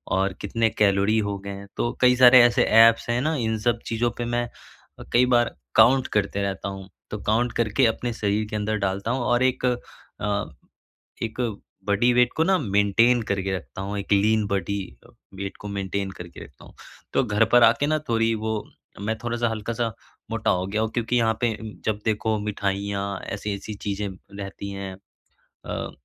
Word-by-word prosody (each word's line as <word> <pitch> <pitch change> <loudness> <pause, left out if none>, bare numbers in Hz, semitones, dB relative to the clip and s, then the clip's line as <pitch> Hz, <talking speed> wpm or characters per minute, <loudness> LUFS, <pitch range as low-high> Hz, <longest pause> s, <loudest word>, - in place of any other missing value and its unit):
और 95 0 +1
कितने 115 +3 +1
कैलोरी 105 0 +2
हो 100 -1 -2
गए 100 - -4
हैं 100 0 -8
तो 120 - 0
कई 125 0 +6
सारे 125 0 +8
ऐसे 120 0 +4
ऐप्स 115 +1 +5
हैं 120 +1 +1
न 155 +4 0
इन 110 -2 -1
सब 120 +1 +1
चीज़ों 115 +1 0
पे 120 - -2
मैं 120 0 -1 0.7
कई 125 +1 +5
बार 120 0 +3 0.2
काउंट 130 +1 +5
करते 100 -1 0
रहता 100 0 -3
हूँ 95 0 -10 0.2
तो 105 - -4
काउंट 120 +3 +1
करके 115 +3 +2
अपने 115 +1 0
शरीर 105 -1 0
के 110 - -4
अंदर 110 +1 -1
डालता 100 +4 -2
हूँ 130 - -1
और 120 +1 +2
एक 130 0 +1
अ, 105 -4 -3 0.7
एक 115 +2 -4 0.5
बॉडी 120 +5 +3
वेट 125 0 +4
को 160 - +3
न 190 +1 +3
मेंटेन 110 +4 +3
करके 95 -1 0
रखता 80 +2 -9
हूँ, 100 +1 -4
एक 100 +1 -4
लीन 105 +1 +3
बॉडी 100 0 -1 0.6
वेट 100 - -5
को 105 - -7
मेंटेन 95 0 -2
करके 85 -1 -10
रखता - - -17
हूँ। - - -16 0.4
तो 135 - +2
घर 105 0 +2
पर 120 0 +7
आके 115 +5 +4
ना 155 +1 +1
थोड़ी 115 -1 +2
वो 110 0 0 0.5
मैं 110 +2 -2
थोड़ा-सा 120 0 0
हल्का-सा 115 +1 -3 0.4
मोटा 110 -1 0
हो 90 0 0
गया 105 +2 -2
हूँ 110 - -1
क्योंकि 120 +1 0
यहाँ 115 -1 +3
पे 115 -3 +1 0.3
जब 105 -1 0
देखो 110 0 0
मिठाइयाँ 100 -1 -2 0.2
ऐसी-ऐसी 100 +1 -5
चीज़ें 100 0 -3 0.3
रहती 100 0 -6
हैं। 95 -1 -6 0.5
अ, - - -7
110 Hz, 180 wpm, -24 LUFS, 100-120 Hz, 0.7 s, सारे